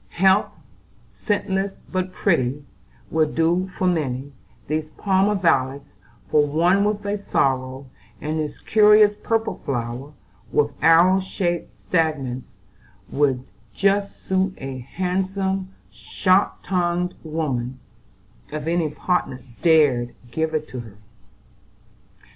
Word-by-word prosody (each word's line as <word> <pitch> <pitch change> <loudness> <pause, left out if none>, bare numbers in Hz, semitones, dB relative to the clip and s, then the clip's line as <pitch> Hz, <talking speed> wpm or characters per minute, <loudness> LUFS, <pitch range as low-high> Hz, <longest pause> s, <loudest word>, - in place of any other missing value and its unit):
Heath, 190 +2 +4 0.6
scentless 195 -2 -1 0.2
but 185 0 -1
pretty, 145 -7 0 0.5
would 155 -1 +1
do 175 +3 +2
for 185 - 0
many; 140 -6 -1 0.4
these 155 +1 -2
Parma 195 +1 +2
violets 135 - 0 0.3
for 150 - +5
one 170 +7 +3
with 205 0 -1
a 205 0 -1
sorrow; 130 -6 0 0.3
and 155 +1 -2
this 150 -2 -4
curious 210 -1 +5
purple 225 0 -1
flower 125 +1 -4 0.4
with 145 0 +2
arrow 170 +4 +6
shaped 180 -2 -3
stamens 145 -7 -2 0.6
would 135 -3 +1 0.3
just 200 +1 0
suit 190 0 0
a 135 -1 -6
handsome, 190 +5 -2 0.2
sharp 185 +1 +1
tongued 180 -1 0
woman, 135 -6 -2 0.7
if 150 0 -4
any 165 -1 +1
partner 145 -5 -2 0.2
dared 145 -8 +3 0.2
give 160 +2 -1
it 155 0 -2
to 130 - -6
her." 110 -4 -10
165 Hz, 110 wpm, -22 LUFS, 140-190 Hz, 0.7 s, arrow